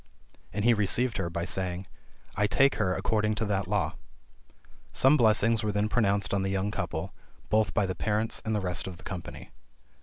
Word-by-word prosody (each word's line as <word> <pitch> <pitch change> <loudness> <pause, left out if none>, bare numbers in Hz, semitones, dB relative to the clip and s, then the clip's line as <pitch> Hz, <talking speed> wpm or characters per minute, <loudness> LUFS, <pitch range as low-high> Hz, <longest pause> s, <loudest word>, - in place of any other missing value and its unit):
And 105 +2 -2
he 120 - +6
received 110 +3 +2
her, 95 -4 -2
by 85 0 -3
saying, 95 -1 -3 0.5
"I 105 - +2
take 135 +4 +4
her 90 -3 +1
according 110 -1 0
to 110 +1 -1
that 100 -3 -1
law." 105 +1 -1 0.9
Some 135 +3 +5
blessings 115 -2 +4
were 105 - -1
then 105 +1 0
pronounced 100 -4 +1
on 100 - +1
the 95 - -1
young 95 +1 -1
couple, - - -4 0.4
both 110 -3 +1
by 105 - +3
the 95 - -2
parents 110 +3 -1
and 110 -1 -1
the 105 - 0
rest 90 -7 -2
of 90 -2 -7
the 90 - -16
company. 90 -2 -8
105 Hz, 190 wpm, -28 LUFS, 95-110 Hz, 0.9 s, he